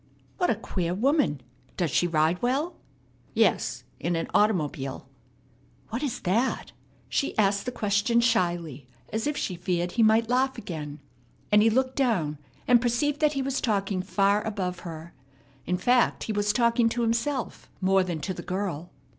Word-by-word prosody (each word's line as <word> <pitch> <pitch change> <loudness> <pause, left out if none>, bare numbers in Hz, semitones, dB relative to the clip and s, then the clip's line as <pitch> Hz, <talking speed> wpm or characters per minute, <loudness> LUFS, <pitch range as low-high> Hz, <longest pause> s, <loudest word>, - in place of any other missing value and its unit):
"What 355 - +2
a - - +3
queer 180 -3 -3
woman! 260 - +2 0.4
Does 170 -6 0
she 175 - +2
ride 160 +1 +1
well?" 275 +8 0 0.6
"Yes, 125 - +1 0.2
in 175 +1 -1
an 165 - -1
automobile!" 150 -10 0 0.8
"What 235 +4 -3
is 280 -6 -3
that?" 225 +8 0 0.4
She 280 - -1
asked 200 0 +2
the - - 0
question 210 +1 +1
shyly 175 - 0 0.3
as 220 +5 -1
if 295 0 -1
she 185 - -2
feared 175 0 -2
he 235 - 0
might 220 +1 +4
laugh 255 +2 +1
again; 150 -9 -6 0.5
and 210 0 +6
he 225 - +5
looked 260 +3 0
down, 180 - +1 0.3
and 245 -2 +6
perceived 265 +5 0
that 300 -1 +3
he 275 -1 -1
was 270 0 -1
talking 200 -4 0
far 200 +2 +2
above 190 -5 -3
her. 165 -1 -8 0.5
In 180 +1 +1
fact, 245 +5 +2
he 220 - -3
was 205 0 +1
talking 235 +1 +3
to 240 +1 -1
himself 235 +3 -2
more 190 0 +3
than 175 -4 -4
to 190 - -3
the - - -7
girl. 180 -3 -3
205 Hz, 165 wpm, -27 LUFS, 175-240 Hz, 0.8 s, and